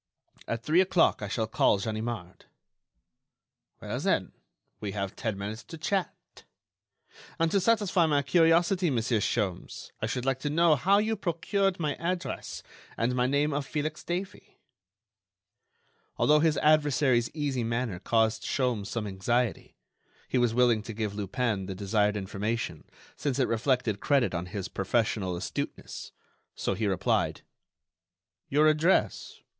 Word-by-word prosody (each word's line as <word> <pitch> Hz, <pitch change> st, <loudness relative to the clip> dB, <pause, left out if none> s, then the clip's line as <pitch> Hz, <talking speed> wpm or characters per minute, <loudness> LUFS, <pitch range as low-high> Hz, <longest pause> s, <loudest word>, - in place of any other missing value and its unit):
At 115 Hz, 0 st, -3 dB
three 165 Hz, +4 st, +4 dB
o'clock 180 Hz, -8 st, +3 dB
I 100 Hz, -, -3 dB
shall 110 Hz, +2 st, -1 dB
call 110 Hz, -1 st, +3 dB
Ganimard." 110 Hz, -3 st, -5 dB, 1.3 s
"Well, -, -, -4 dB
then, -, -, 0 dB, 0.5 s
we 100 Hz, -2 st, -4 dB
have 100 Hz, -2 st, -3 dB
ten 110 Hz, -4 st, -3 dB
minutes 105 Hz, +3 st, -5 dB
to 165 Hz, -, -9 dB
chat. 185 Hz, +4 st, -1 dB, 1.2 s
And 165 Hz, 0 st, +1 dB
to 200 Hz, -, +3 dB
satisfy 195 Hz, -4 st, +3 dB
my 145 Hz, -2 st, +2 dB
curiosity, 170 Hz, +4 st, +3 dB
Monsieur 115 Hz, -3 st, +1 dB
Sholmes, 100 Hz, -4 st, -2 dB
I 110 Hz, -, 0 dB
should 125 Hz, +2 st, -3 dB
like 135 Hz, -1 st, 0 dB
to 145 Hz, -, -2 dB
know 165 Hz, +1 st, +4 dB
how 190 Hz, +9 st, +3 dB
you 220 Hz, +2 st, +1 dB
procured 190 Hz, +1 st, 0 dB
my 150 Hz, -3 st, 0 dB
address 175 Hz, +1 st, -4 dB, 0.3 s
and 120 Hz, +2 st, +1 dB
my 125 Hz, 0 st, +1 dB
name 145 Hz, +2 st, +1 dB
of 145 Hz, 0 st, -1 dB
Felix 155 Hz, 0 st, -3 dB
Davey?" 185 Hz, +3 st, -5 dB, 1.6 s
Although 150 Hz, 0 st, +4 dB
his 155 Hz, 0 st, +2 dB
adversary's 145 Hz, -5 st, +3 dB
easy 140 Hz, -5 st, -1 dB
manner 115 Hz, -4 st, -2 dB
caused 110 Hz, +2 st, +1 dB
Sholmes 125 Hz, -7 st, -1 dB
some 110 Hz, 0 st, -3 dB
anxiety, 110 Hz, +5 st, -1 dB, 0.5 s
he 130 Hz, -, +1 dB
was 120 Hz, -2 st, +3 dB
willing 120 Hz, -2 st, +3 dB
to 115 Hz, +2 st, -7 dB
give 105 Hz, -1 st, -3 dB
Lupin 105 Hz, -1 st, -2 dB
the 95 Hz, -, -5 dB
desired 105 Hz, +2 st, +1 dB
information 105 Hz, +4 st, -3 dB, 0.3 s
since 140 Hz, -4 st, -2 dB
it 130 Hz, -, +2 dB
reflected 115 Hz, -2 st, 0 dB
credit 140 Hz, -4 st, +2 dB
on 85 Hz, +1 st, -3 dB
his 100 Hz, 0 st, -4 dB
professional 100 Hz, -2 st, -1 dB
astuteness; 85 Hz, -, -5 dB, 0.4 s
so -, -, -1 dB
he 110 Hz, -, -1 dB
replied: 95 Hz, -3 st, 0 dB, 1.1 s
"Your 150 Hz, +3 st, +4 dB
address? 155 Hz, +4 st, +1 dB
125 Hz, 140 wpm, -28 LUFS, 110-155 Hz, 1.6 s, three